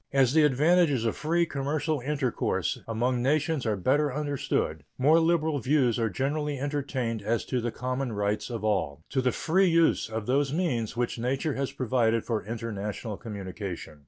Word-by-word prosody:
As 135 -2 +3
the 160 - +5
advantages 150 -2 +3
of 115 - 0
free 170 +3 +1
commercial 150 +1 -1
intercourse 135 -1 -1
among 120 +2 0
nations 145 0 +1
are 110 - +1
better 140 +9 +1
understood, 140 - -2
more 150 +5 +5
liberal 160 -3 +2
views 125 -2 +2
are 115 -1 +1
generally 145 - -1
entertained 130 -5 -2
as 110 +3 -1
to 125 -2 -1
the 120 - -1
common 125 +2 -3
rights 105 +1 -1
of 115 -3 -5
all 80 -8 -1
to 135 - +1
the 125 -1 +2
free 185 +7 +2
use 165 -6 +3
of 110 -1 -4
those 135 +3 +1
means 130 - -1
which 120 -1 -1
nature 135 +5 -1
has 135 0 -2
provided 115 -3 +1
for 115 -3 -1
international 110 -1 -4
communication. 95 -7 -7
130 Hz, 165 wpm, -27 LUFS, 115-150 Hz, -, the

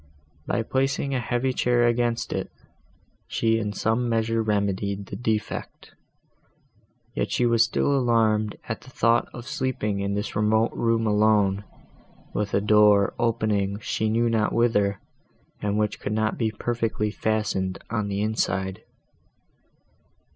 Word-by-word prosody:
By 115 - 0
placing 135 +3 -1
a 130 - +1
heavy 120 +2 -1
chair 120 -1 +2
against 120 0 0
it, - - -3 0.8
she 115 0 +1
in 105 -2 -2
some 115 +3 0
measure 115 0 +1
remedied 100 -2 -1
the - - -7
defect; 110 -3 -3 1.2
yet - - -2
she 125 - +1
was 115 -1 +4
still 140 +4 +1
alarmed 110 -4 +2
at 110 - -4
the - - -14
thought 115 -2 +2
of 120 +1 -9
sleeping 110 -7 -2
in 100 0 -1
this 105 - -3
remote 110 +2 +2
room 115 -1 +1
alone, 105 -2 +2 0.7
with 105 -1 -1
a 100 - +2
door 105 -1 +5
opening 110 -4 0
she 110 0 -2
knew 115 +2 +2
not 110 -2 +1
whither, 105 -4 +2 0.6
and 105 0 -1
which 105 0 -1
could 105 - -3
not 110 0 0
be 115 -2 0
perfectly 110 -1 -2
fastened 105 -4 -1
on 105 -3 -1
the 100 0 -2
inside. 95 -3 -1
110 Hz, 140 wpm, -25 LUFS, 105-115 Hz, 1.2 s, door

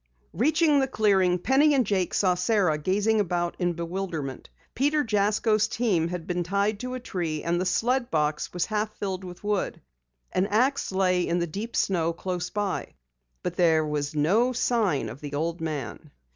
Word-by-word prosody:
Reaching 305 +3 +3
the 270 - +1
clearing, 195 -7 +2
Penny 275 - +3
and 255 -3 +3
Jake 190 -3 0
saw 185 -2 +3
Sara 180 -4 +1
gazing 205 +7 +1
about 175 -3 -1
in 175 -1 +1
bewilderment. 170 -5 -5 0.2
Peter 295 +4 +2
Jasko's 215 0 +2
team 215 -8 +1
had 175 -1 -5
been 180 0 -1
tied 200 +4 0
to 250 +1 -4
a - - -4
tree 170 -9 -3
and 170 +1 0
the 185 - 0
sled 240 +6 +1
box 150 -1 0
was 175 -2 -1
half 215 0 -2
filled 190 -2 -4
with 180 +1 -10
wood. 205 -2 -1 0.5
An 185 +2 +1
ax 245 +5 +1
lay 185 -1 +2
in 170 - +1
the 170 - 0
deep 205 +8 -6
snow 170 -3 +1
close 180 +1 -4
by. 205 -2 -3 0.5
But 175 - -3
there 160 -3 +4
was 150 0 -3
no 210 +12 +2
sign 215 - +1
of 120 +6 -9
the 145 -1 -5
old 165 +3 -2
man. 150 -2 -5
185 Hz, 175 wpm, -26 LUFS, 170-215 Hz, 0.5 s, there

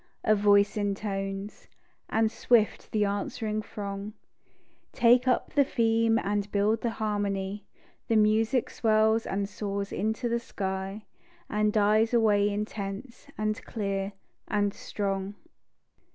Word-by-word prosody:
A 215 - +4
voice 205 0 +4
intones; 195 -1 -3 0.4
and 220 0 +2
swift 230 -3 +1
the 210 -1 +2
answering 210 +2 -2
throng 200 0 -6 0.8
Take 245 +1 +4
up 255 - +1
the 285 - +5
theme 225 -2 +2
and 205 -1 -1
build 210 +2 +1
the 235 - 0
harmony; 205 -2 -2 0.4
The 225 - +2
music 220 +3 +2
swells 220 0 +2
and 200 +1 -1
soars 200 -1 -4
into 220 +4 -1
the 235 0 0
sky 195 -1 -4 0.5
And 210 0 +2
dies 215 +2 +3
away 210 -3 +4
intense, 210 +4 -5
and 215 0 -2
clear 195 -2 -3 0.3
and 205 -1 0
strong. 195 -1 -3
210 Hz, 120 wpm, -28 LUFS, 200-220 Hz, 0.8 s, the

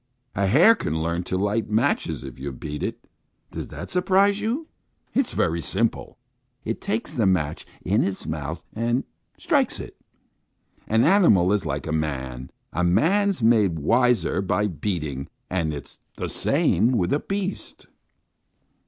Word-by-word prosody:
A 100 +1 +1
hare 160 - +7
can 80 - -2
learn 85 +2 -1
to 95 - -2
light 105 +3 0
matches 115 - 0
if 65 -1 -9
you 70 +1 -4
beat 75 +3 -6
it. - - -5 0.4
Does - - -5
that - - -8
surprise 195 +3 +3
you? 240 +9 -1 0.5
It's 270 -3 +1
very 85 0 +1
simple! - - -1 0.5
It - - -3
takes 110 +2 -2
the 110 -5 +2
match 80 -5 0 0.2
in 105 +6 +2
its 95 -1 -3
mouth 80 +1 -4
and 120 +3 0 0.3
strikes - - +1
it. - - -8 0.9
An 110 +2 +3
animal 100 - +5
is 100 -5 0
like 75 -1 -3
a 80 - -3
man. 65 -5 -3 0.2
A 90 - 0
man's 180 - +2
made 105 -7 +4
wiser 115 - +2
by 100 +2 0
beating, 75 -8 -3 0.2
and 85 -4 0
it's 70 -2 -8 0.2
the - - -3
same 110 +9 +2
with 90 -7 +1
a 145 - +2
beast." 195 +2 -4
95 Hz, 150 wpm, -24 LUFS, 80-125 Hz, 0.9 s, hare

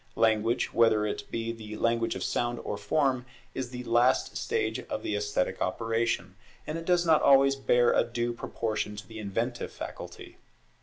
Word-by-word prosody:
Language, 115 +1 +2
whether 110 -2 +4
it 105 -1 -4
be 115 0 -2
the 110 -2 -8
Language 115 +1 +1
of - - -4
sound 120 0 -1
or - - -3
form, 130 +5 +1 0.3
is 130 -2 -4
the 125 0 -6
last 120 +2 +2
stage - - -1
of - - -5
the 105 - -1
esthetic 105 -3 -1
operation, 115 -3 -1 0.3
and 155 +2 -3
it 165 - -8
does 175 0 +3
not 160 -2 +5
always 135 0 +6
bear 120 -3 +3
a - - +4
due 120 0 -2
proportion 110 -2 -3
to 105 +1 -9
the 110 0 -9
inventive 115 +4 -3
faculty. - - -8
115 Hz, 170 wpm, -29 LUFS, 105-125 Hz, 0.3 s, always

